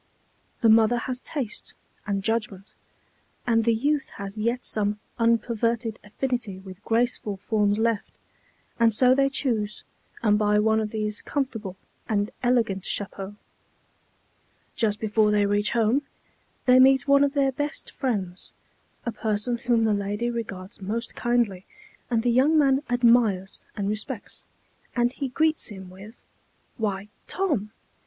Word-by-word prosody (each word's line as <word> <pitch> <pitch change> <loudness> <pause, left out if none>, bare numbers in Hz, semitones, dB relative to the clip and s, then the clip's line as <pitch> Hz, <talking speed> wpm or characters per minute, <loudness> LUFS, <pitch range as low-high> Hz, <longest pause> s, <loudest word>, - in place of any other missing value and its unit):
The 230 - +5
mother 225 +2 +5
has 250 +1 -3
taste 260 -9 -5 0.3
and 200 -1 -1
judgment, 215 -3 -2 0.7
and 225 -2 +2
the 230 - +4
youth 285 +4 0
has 200 0 -6
yet 235 +3 -1
some 210 -1 0 0.2
unperverted 230 0 +1
affinity 225 -1 -3
with 190 +1 -12
graceful 225 -3 0
forms 205 +1 +1
left, 225 -1 0 0.7
and 225 -2 +4
so 255 +2 +5
they 275 +1 +3
choose 220 -7 -1 0.4
and 210 -2 +4
buy 210 0 +3
one 220 +1 +3
of 215 -1 -2
these 210 -1 -3
comfortable 225 -9 -3 0.3
and 205 -1 0
elegant 230 -6 +1
chapeaux. 195 0 -3 1.4
Just 210 -2 0
before 215 0 +2
they 210 -1 +3
reach 205 +1 +1
home, 235 +4 +2 0.6
they 255 -1 +6
meet 265 0 +5
one 280 0 +6
of 280 -1 +1
their 275 -1 +3
best 290 +3 -3
friends, 195 -8 -3 0.5
a 235 - -1
person 220 +2 -2
whom 235 -2 +2
the 220 -1 +3
lady 205 +4 -1
regards 205 -4 -6
most 225 +5 -3
kindly, 235 -6 0 0.5
and 230 -2 +1
the 245 - +2
young 275 +6 +4
man 275 -2 +4
admires 230 -6 +2
and 200 -1 -2
respects, 215 +2 -4 0.5
and 240 0 +2
he 275 -1 -3
greets 315 +4 +1
him 190 -3 -9
with, 200 +5 -13 0.6
"Why, 205 -3 -2 0.2
Tom! 295 - -1
225 Hz, 140 wpm, -25 LUFS, 205-245 Hz, 1.4 s, they